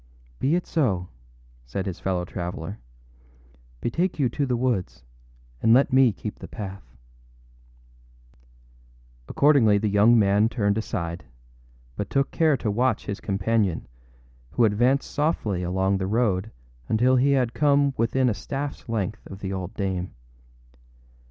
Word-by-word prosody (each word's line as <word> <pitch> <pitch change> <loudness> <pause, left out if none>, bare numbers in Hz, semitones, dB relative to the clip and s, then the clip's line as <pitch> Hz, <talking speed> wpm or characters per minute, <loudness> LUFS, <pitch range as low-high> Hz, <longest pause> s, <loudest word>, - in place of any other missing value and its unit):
â - - +1
âBe 170 - +4
it 180 - -4
so,â 100 - 0 0.6
said 60 +11 -4
his 95 -4 -5
fellow 90 -2 -1
traveller. 90 +3 -6 1.0
âBetake 170 +10 -1
you 135 -5 +2
to 140 +4 -2
the 125 -1 0
woods, 115 - -2 0.6
and 115 +1 +5
let 135 0 +3
me 130 -2 +6
keep 105 +2 -7
the - - -8
path.â 100 -3 -7 2.5
Accordingly 135 -8 +4
the 105 +1 0
young 105 +4 +5
man 105 +1 +3
turned 100 -3 0
aside, 85 - -4 0.7
but 100 - -4
took 135 0 0
care 155 -4 +2
to 110 - -2
watch 120 +2 0
his 100 - -5
companion, 100 -2 0 0.7
who 120 - +4
advanced 120 +6 +2
softly 145 - -1
along 95 +2 0
the 95 - -2
road 105 -2 0 0.4
until 125 +4 +3
he 140 +3 +3
had 125 -4 +1
come 140 -1 +3
within 125 +3 +1
a - - +3
staffâs 140 +3 -5
length 110 -1 -3
of 95 - -9
the 95 -1 -5
old 95 -1 -4
dame. 95 -2 -3
110 Hz, 140 wpm, -25 LUFS, 95-130 Hz, 2.5 s, me